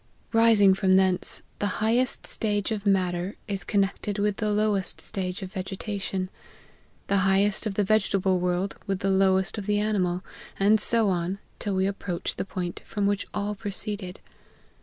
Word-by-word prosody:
Rising 225 -4 +6
from 190 -1 +2
thence, 190 -1 +2 0.2
the 205 -2 -1
highest 235 +4 +1
stage 205 -1 -1
of 210 -1 -2
matter 185 -1 +1
is 195 -3 -2
connected 200 +2 0
with 205 0 0
the 215 - -1
lowest 210 -2 0
stage 190 -2 -4
of 190 +1 -8
vege 190 0 -4
tation; 195 -3 -3 0.8
the 200 - +1
highest 195 +3 +2
of 200 - -4
the 205 - +2
vegetable 195 -3 +2
world, 180 +2 -1
with 195 0 -1
the 195 - +1
lowest 190 +2 +2
of 200 - -7
the 205 0 +2
animal, 185 -4 0 0.4
and 210 +2 +5
so 225 -2 +2
on, 180 +1 -1 0.2
till 205 -2 -2
we 190 0 +2
ap 200 0 -4
proach 175 -3 -3
the - - -3
point 180 -2 -4
from 205 -1 -2
which 200 0 0
all 205 0 -2
proceeded. 200 -2 -5
195 Hz, 170 wpm, -26 LUFS, 190-210 Hz, 0.8 s, Rising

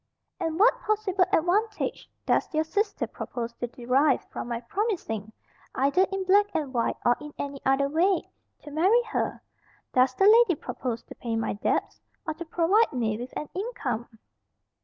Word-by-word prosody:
"And 325 +1 -2
what - - +5
possible 415 -4 +1
advantage 410 +6 0 0.2
does - - +1
your 310 - +3
sister 405 +6 -1
propose 235 -1 -6
to 245 - -2
derive 255 +4 +1
from - - -5
my 235 -1 -2
promising, 235 - -3 0.4
either 280 +8 +3
in 390 0 -1
black 405 +2 +4
and 285 -4 -2
white 235 -2 0
or 240 - +5
in 300 0 -8
any 280 -1 -5
other 270 +1 +3
way, 345 +6 +1 0.4
to 295 - -10
marry 380 +11 +3
her? 445 - -3 0.5
Does 255 +1 +3
the 390 - +3
lady 440 -3 +6
propose 240 -3 -4
to - - -11
pay 230 -2 -4
my 225 - -1
debts, 205 - -1 0.2
or 315 - -2
to 340 +2 -8
provide 355 +7 +3
me 225 -4 0
with 245 +2 -6
an 300 - -4
income?" 335 - -3
315 Hz, 165 wpm, -27 LUFS, 250-395 Hz, 0.5 s, lady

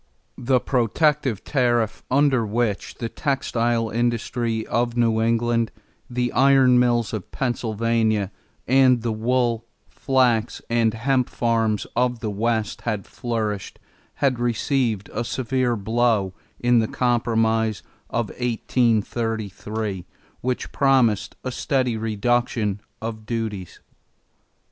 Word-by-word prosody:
The 125 +1 +2
protective 130 - +1
tariff, 120 -5 +1
under 135 -2 +3
which 110 -1 -1
the 115 - -4
textile 120 -4 -1
industry 115 -1 -1
of 120 +1 -1
New 115 -2 +2
England, 115 0 +1 0.4
the 125 -1 -1
iron 135 -2 +5
mills 120 -2 +2
of 105 -5 -5
Pennsylvania, 115 -4 0 0.4
and 130 -2 +4
the 115 - 0
wool, 115 +1 0 0.3
flax, 125 -4 +1
and 115 -1 +2
hemp 125 +2 +1
farms 115 -3 0
of 125 0 +1
the 110 -3 -3
West 110 0 -1
had 105 -4 -2
flourished, 110 -5 -3 0.4
had 135 -4 +1
received 120 -3 0
a - - -1
severe 125 0 0
blow 110 -2 +1 0.3
in 120 -1 +4
the 110 - +1
compromise 115 -3 +1 0.3
of 115 -3 -1
1833 110 -4 -1 0.4
which 125 0 -2
promised 130 -7 +2
a 130 - -3
steady 125 -2 0
reduction 110 -1 0 0.2
of 110 -1 -5
duties. 110 -6 -4
115 Hz, 110 wpm, -23 LUFS, 110-125 Hz, 0.4 s, iron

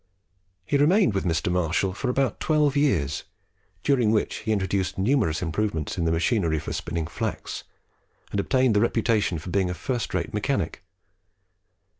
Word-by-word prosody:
He 140 - +1
remained 165 - +4
with 95 - -1
Mr. 85 +1 0
Marshall 90 +2 +1
for 125 +6 -3
about 135 +1 0
twelve 150 -2 +2
years, 85 - +1 0.6
during 125 -6 +3
which 110 -1 +1
he 110 - -3
introduced 95 -2 0
numerous 95 - +1
improvements 80 -3 -2
in 85 - -1
the 80 - +2
machinery 85 0 +1
for - - -4
spinning 85 -1 -3
flax, - - -4 0.7
and 100 - -1
obtained 130 +2 +2
the 105 - +4
reputation 110 -5 +1
of 85 +4 -7
being 95 -1 +1
a 90 - -3
first 125 +2 -3
rate - - -2
mechanic. - - -1
100 Hz, 155 wpm, -25 LUFS, 85-125 Hz, 0.7 s, remained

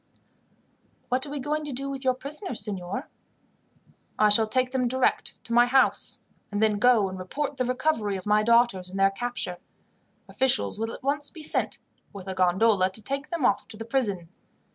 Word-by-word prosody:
"What 260 +3 +2
are 290 - -6
you - - -3
going 300 +3 -2
to 295 - -5
do 275 +2 -2
with 275 -1 -5
your 255 -1 +2
prisoners, 280 - -2
signor?" 195 -3 -4 1.1
"I 215 - +4
shall 220 +1 +4
take 255 +3 +1
them 255 -2 0
direct 260 +1 0
to 235 - -4
my 240 +1 +5
house, 265 +1 +2 0.3
and 205 - -2
then 215 -1 +2
go 235 -4 +4
and 185 0 -7
report 280 +10 -4
the 255 - 0
recovery 250 -5 0
of 185 - -7
my 210 0 +3
daughters, 230 -5 +2
and 195 +1 -6
their 195 0 +4
capture. 240 -4 -4 0.7
Officials 230 - +1
will 225 +1 -2
at - - -10
once 290 +1 0
be 320 -3 -11
sent, - - +2 0.4
with 195 -2 -10
a 190 - -3
gondola, 185 +2 +3
to 190 +4 -4
take 275 +2 -4
them 335 -7 -1
off 200 - +1
to 220 - -10
the 225 - -7
prison. 205 -9 -1
235 Hz, 190 wpm, -26 LUFS, 200-265 Hz, 1.1 s, my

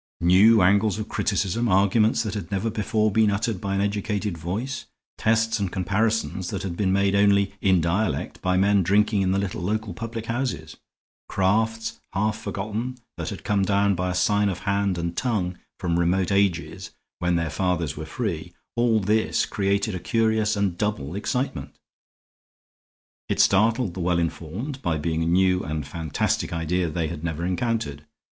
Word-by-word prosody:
New 95 +5 +6
angles 100 +3 +3
of 110 0 -4
criticism, 105 +1 0
arguments 105 +4 +3
that 105 -4 -3
had 100 -5 -5
never 100 +3 -1
before 110 0 0
been 110 +1 +3
uttered 105 -1 -1
by 100 0 -2
an 100 - +1
educated 105 -1 -1
voice, 105 +11 -4 0.3
tests 115 0 +2
and 100 -3 -1
comparisons 95 0 0
that 100 -2 -4
had 90 -3 -4
been 95 0 +1
made 100 0 +2
only 100 -1 +3
in 95 -2 +4
dialect 90 +5 -1
by 90 0 +1
men 100 +1 +4
drinking 100 +3 +2
in 95 -1 +1
the 95 - +1
little 100 -2 -2
local 105 +2 -2
public 115 +3 -6
houses, 120 +3 -3 0.5
crafts 110 +4 0
half 105 +2 +1
forgotten 110 +4 -4 0.2
that - - -4
had - - -7
come 100 -2 +1
down 100 +1 +2
by 90 0 -1
sign 100 +3 +2
of 90 - -4
hand 100 -2 0
and 85 0 -3
tongue 95 -8 -1 0.2
from 85 -1 0
remote 90 +2 +1
ages 100 -4 0 0.3
when 90 -1 +1
their 85 -2 -1
fathers 85 -3 -1
were 80 - -6
free 85 -2 -4 0.2
all 120 -2 +3
this 105 +2 +1
created 100 +1 0
a 90 - -3
curious 110 +1 +1
and 100 -3 -1
double 95 -9 -2
excitement. 125 +7 -3 1.5
It - - -1
startled 110 0 +3
the 95 - -7
well 90 0 +1
informed 90 - -3
by 85 -8 0
being 80 +1 -1
a 80 - 0
new 90 +1 +3
and 75 -2 -3
fantastic 80 +1 -2
idea 85 +1 -1
they 80 0 -1
had 80 0 -6
never 85 0 -2
encountered. 90 -7 -2
100 Hz, 165 wpm, -24 LUFS, 90-110 Hz, 1.5 s, New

